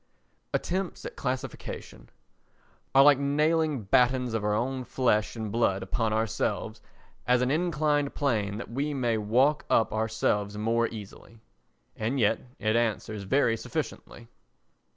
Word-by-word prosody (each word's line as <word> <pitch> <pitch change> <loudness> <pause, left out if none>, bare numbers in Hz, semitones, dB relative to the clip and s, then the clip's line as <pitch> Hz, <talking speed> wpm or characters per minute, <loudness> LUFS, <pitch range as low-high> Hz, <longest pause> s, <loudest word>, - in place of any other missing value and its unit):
Attempts 185 +1 -2
at - - -7
Classification 130 -1 -5 0.9
are 135 - +9
like 145 -1 +6
nailing 150 -1 +1
battens 125 +3 +2
of 115 -2 -1
our 105 0 +1
own 130 +3 -1
flesh 120 -4 +1
and 110 -2 -4
blood 100 -4 +1
upon 110 +3 -1
ourselves 110 0 -1 0.5
as 125 0 +4
an 125 - +1
inclined 150 -3 +1
plane 105 -8 0
that 115 - -7
we 145 +4 -2
may 120 -4 0
walk 130 +8 +2
up 110 - +3
ourselves 110 -2 0
more 115 +2 +1
easily; 110 +1 -10 0.6
and 120 +5 -2
yet 105 -3 +3 0.2
it 110 +1 0
answers 110 -2 -1
very 115 +1 +2
sufficiently. 115 +1 -6
120 Hz, 130 wpm, -28 LUFS, 110-140 Hz, 0.9 s, are